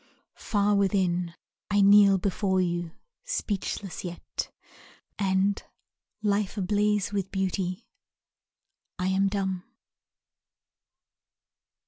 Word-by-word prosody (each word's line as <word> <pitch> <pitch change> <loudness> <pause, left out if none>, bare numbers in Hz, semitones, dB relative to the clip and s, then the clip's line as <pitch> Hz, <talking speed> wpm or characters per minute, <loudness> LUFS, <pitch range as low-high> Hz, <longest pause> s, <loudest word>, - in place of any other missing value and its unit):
Far 205 -1 +1
Within 185 -4 +1 0.3
I 205 0 +3
kneel 200 0 +7
before 190 0 0
you, 175 -1 -1 0.3
speechless 205 - -3
yet, 175 -1 -5 0.7
And 195 0 +1 0.6
life 205 0 0
ablaze 205 +1 +1
with 195 -2 -1
beauty, 190 +1 -2 1.1
I 180 +1 0
am 195 +1 +2
dumb. 190 -2 -2
195 Hz, 80 wpm, -27 LUFS, 185-205 Hz, 1.1 s, kneel